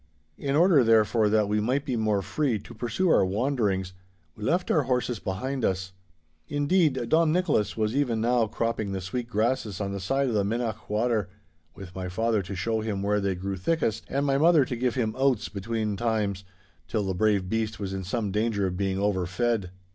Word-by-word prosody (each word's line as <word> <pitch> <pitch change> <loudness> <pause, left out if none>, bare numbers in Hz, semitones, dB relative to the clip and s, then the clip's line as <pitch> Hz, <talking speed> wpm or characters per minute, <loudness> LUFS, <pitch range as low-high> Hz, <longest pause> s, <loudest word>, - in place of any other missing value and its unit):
In 140 0 -1
order, 165 -4 +5
therefore, 110 -1 +4
that 105 -1 +2
we 105 +1 +1
might 130 +6 0
be 130 - -1
more 105 -3 +1
free 140 -3 0
to 105 +4 -11
pursue 120 +11 -1
our - - +5
wanderings, 100 -3 0 0.4
we 105 - -10
left 175 - +1
our 155 - +4
horses 125 -3 0
behind 120 +8 -3
us. 95 -1 -1 0.6
Indeed, 145 -3 +1
Dom 160 0 +4
Nicholas 160 - +1
was 110 +2 0
even 125 -6 +1
now 120 0 +2
cropping 110 -2 -2
the 95 - -2
sweet 115 +7 -4
grasses 110 -2 -1
on 100 -1 -2
the 100 - -4
side 135 +8 0
of 120 - -1
the 105 -2 +2
Minnoch 115 +1 -3
water, 110 -2 0 0.5
with 95 -3 -10
my 95 0 -5
father 110 +3 +1
to 95 +1 -6
show 110 +4 -1
him 105 -3 -3
where 105 0 +1
they 100 -1 0
grew 95 +2 -4
thickest 115 - 0
and 140 +2 0
my 135 -1 +2
mother 160 -3 +5
to 125 - -4
give 125 +1 -1
him 115 -4 0
oats 130 -4 +1
between 110 +1 -2
times, 105 -3 -1 0.4
till 110 -3 -1
the 95 - -1
brave 100 -1 +1
beast 110 0 -2
was 95 -2 -4
in 95 0 -4
some 100 +2 -2
danger 105 -1 0
of 90 -1 -2
being 95 0 -1
overfed. 100 +2 0
110 Hz, 200 wpm, -26 LUFS, 100-125 Hz, 0.6 s, order